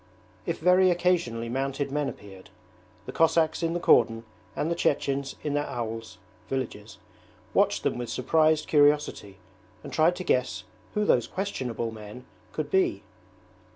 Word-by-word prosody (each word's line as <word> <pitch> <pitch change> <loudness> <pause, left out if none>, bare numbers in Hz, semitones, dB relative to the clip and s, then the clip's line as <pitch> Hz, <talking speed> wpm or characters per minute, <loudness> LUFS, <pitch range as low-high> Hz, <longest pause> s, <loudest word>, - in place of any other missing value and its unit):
If - - -1
very 180 +2 +4
occasionally 170 -10 +1
mounted 135 +3 -2
men 145 0 0
appeared, 95 -2 -12 0.6
the - - -6
Cossacks 160 0 +2
in 165 0 0
the 175 - -1
cordon 115 -7 +4 0.3
and 160 - -1
the - - +1
Chechens 140 -3 0
in 150 - -2
their 145 0 0
aouls 115 -4 -5 0.3
(villages) 115 -5 -4 0.6
watched - - +2
them - - -1
with 120 - -4
surprised 155 +4 +2
curiosity 145 -9 +2 0.5
and - - -9
tried 165 +3 +3
to 185 - -5
guess 125 -7 0 0.3
who 210 0 +1
those 120 - +3
questionable 125 - -3
men 110 +3 -10 0.3
could - - -4
be. 380 -2 +1
140 Hz, 145 wpm, -27 LUFS, 115-165 Hz, 0.6 s, very